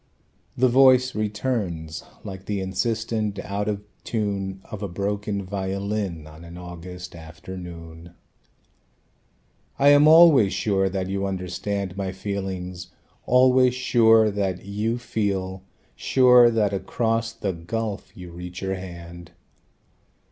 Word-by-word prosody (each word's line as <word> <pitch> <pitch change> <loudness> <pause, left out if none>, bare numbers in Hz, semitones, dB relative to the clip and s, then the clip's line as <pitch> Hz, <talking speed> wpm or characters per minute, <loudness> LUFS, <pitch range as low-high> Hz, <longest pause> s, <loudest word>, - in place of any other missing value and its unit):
The 130 - +4
voice 130 0 +5
returns 105 -7 -3 0.2
like 95 -2 -8
the 105 -1 -1
insistent 110 +1 -2
out 100 +1 -3
of 105 -1 -3 0.2
tune 100 -3 -3
Of 105 - -8
a 100 - -2
broken 100 +2 -3
violin 95 -2 -3
on 80 +2 -13
an 85 +1 -10
August 90 +1 -9
afternoon: 85 0 -10 1.6
"I 140 - +5
am 145 +1 +7
always 155 - +7
sure 95 -2 +1
that 95 -1 -3
you 100 +1 -2
understand 95 +1 -4
My 95 -1 -2
feelings, 95 -2 -5 0.4
always 125 0 +5
sure 115 -4 +4
that 95 -2 -2
you 105 +4 -2
feel, 95 -5 -2 0.3
Sure 125 -2 +5
that 110 -3 +1
across 115 +3 -1
the 100 -4 -3
gulf 100 +5 -4
you 90 -2 -9
reach 90 +1 -8
your 95 0 -1
hand. 85 -1 -10
100 Hz, 120 wpm, -24 LUFS, 90-110 Hz, 1.6 s, am